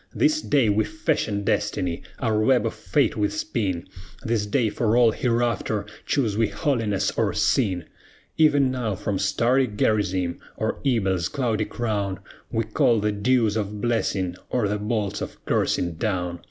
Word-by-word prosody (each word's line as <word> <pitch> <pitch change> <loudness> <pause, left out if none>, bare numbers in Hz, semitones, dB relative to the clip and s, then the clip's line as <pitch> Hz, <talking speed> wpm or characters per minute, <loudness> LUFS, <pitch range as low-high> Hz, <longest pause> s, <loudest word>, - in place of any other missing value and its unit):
This 310 0 +2
day 140 -6 +2
we 105 +1 +3
fashion 150 -9 -1
Destiny, 90 -3 -1 0.2
our 110 -4 0
web 125 +2 +3
of 115 - -1
Fate 90 - +1
we 105 -1 +1
spin; 100 - -2 0.4
This 110 -3 0
day 115 +1 +1
for 115 +2 +1
all 120 -2 +6
hereafter 115 -3 0 0.2
choose 115 -8 +1
we 115 0 +2
holiness 110 -2 0
or - - +1
sin; 95 -10 +1 0.5
Even 145 -4 +4
now 120 -6 -2
from 95 0 -2
starry 120 +6 +2
Gerizim, 100 -5 0 0.2
or - - -2
Ebal's 95 -9 +1
cloudy 115 -6 0
crown, 105 -5 -2 0.3
We 115 - 0
call 110 +1 +2
the 105 +1 +1
dews 110 +1 +2
of 105 -1 -3
blessing 100 -6 -1
or 120 -5 +1
the 105 +1 -1
bolts 105 -1 -2
of - - -6
cursing 85 -1 +1
down! 90 -4 -2
110 Hz, 155 wpm, -24 LUFS, 100-120 Hz, 0.5 s, all